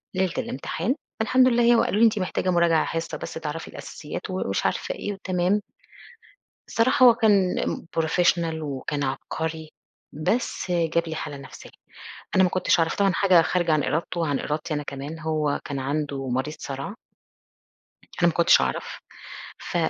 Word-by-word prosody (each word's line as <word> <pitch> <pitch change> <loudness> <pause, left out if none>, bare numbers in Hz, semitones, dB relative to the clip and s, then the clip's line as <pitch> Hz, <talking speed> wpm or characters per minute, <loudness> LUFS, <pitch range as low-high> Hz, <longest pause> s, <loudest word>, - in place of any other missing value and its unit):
ليلة 185 -1 +1
الإمتحان، 170 - -2 0.3
الحمد 255 +3 +4
لله 240 -1 +3
هي 240 0 +6
وقالوا 225 -2 +2
لي: 230 - +7
"أنتِ 215 -2 +3
محتاجة 185 0 -1
مراجعة 170 -2 +3
حِصّة 165 0 -3
بس - - -7
تعرفي 160 0 -5
الأساسيات،" - - -7
ومش - - -2
عارفة - - -1
إيه 205 - -4
وتمام. 185 +1 0 1.1
الصراحة 255 +3 +3
هو 240 - +9
كان 205 -5 +3
ام - - -3
professional 165 0 +1
وكان 145 0 -3
عبقري، 160 +4 -4 0.4
بس 180 - -1
جاب 170 -1 +1
لي 160 - -4
حالة 145 -2 -5
نفسية. 140 - -11 0.7
أنا 190 - +6
ما - - +3
كنتش 185 - +2
أعرف، 165 -1 +1
طبعًا 200 -1 +3
حاجة 185 -2 +5
خارجة 175 0 +1
عن 155 -1 +3
إرادته 170 +2 -2
وعن 145 -4 0
إرادتي 155 +2 -3
أنا 150 - -2
كمان، 140 +3 -6
هو 155 -2 -1
كان 140 - -4
عنده 140 0 -2
مريض 130 +5 -2
صَرَع. 140 +8 -5 1.3
أنا 175 - +5
ما 170 - +2
كنتش 170 +1 +5
أعرف، - - -3 0.6
ف - - -5
165 Hz, 160 wpm, -25 LUFS, 150-190 Hz, 1.3 s, هو